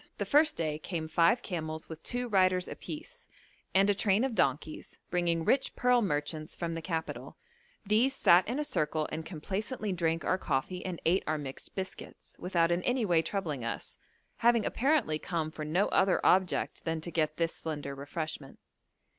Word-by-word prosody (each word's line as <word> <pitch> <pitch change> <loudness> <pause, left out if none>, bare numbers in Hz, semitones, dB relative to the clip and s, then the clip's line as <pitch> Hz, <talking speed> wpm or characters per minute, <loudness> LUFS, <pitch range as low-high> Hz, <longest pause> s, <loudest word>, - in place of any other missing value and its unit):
The - - -2
first 305 +1 +4
day 155 -2 -1
came 160 -2 -4
five 170 +9 +3
camels 160 -4 -4
with 160 -1 -9
two 245 0 -2
riders 185 -4 +3
apiece, 475 +11 -8 0.5
and 195 +1 +6
a 205 - +4
train 200 +2 +2
of 265 -2 0
donkeys, 145 -3 -1
bringing 170 -2 +1
rich 265 +6 +2
pearl 250 -1 +3
merchants 155 -4 -2
from 170 -1 -3
the 165 - -4
capital; 160 -1 -4 0.5
these 230 +7 +3
sat 175 -5 +5
in 245 +5 -1
a 300 - 0
circle 155 - -1
and 160 - -3
complacently 200 - -3
drank 165 -1 0
our 185 - +1
coffee 165 +5 -2
and 180 -3 -4
ate 180 +4 +3
our 155 - +1
mixed 135 -3 -8
biscuits, 190 -1 -7
without 175 -2 +1
in 175 +1 +1
any 245 +2 +1
way 170 -4 +4
troubling 160 - -3
us, 115 - -5 0.4
having 235 -1 +3
apparently 255 - +1
come 160 -2 -2
for 155 - -6
no 175 +7 +2
other 190 -1 +3
object 185 -1 +2
than 165 -1 -1
to 170 - -5
get 155 -2 0
this 165 -1 0
slender 145 -3 -5
refreshment. 145 0 -5
170 Hz, 175 wpm, -31 LUFS, 155-205 Hz, 0.5 s, and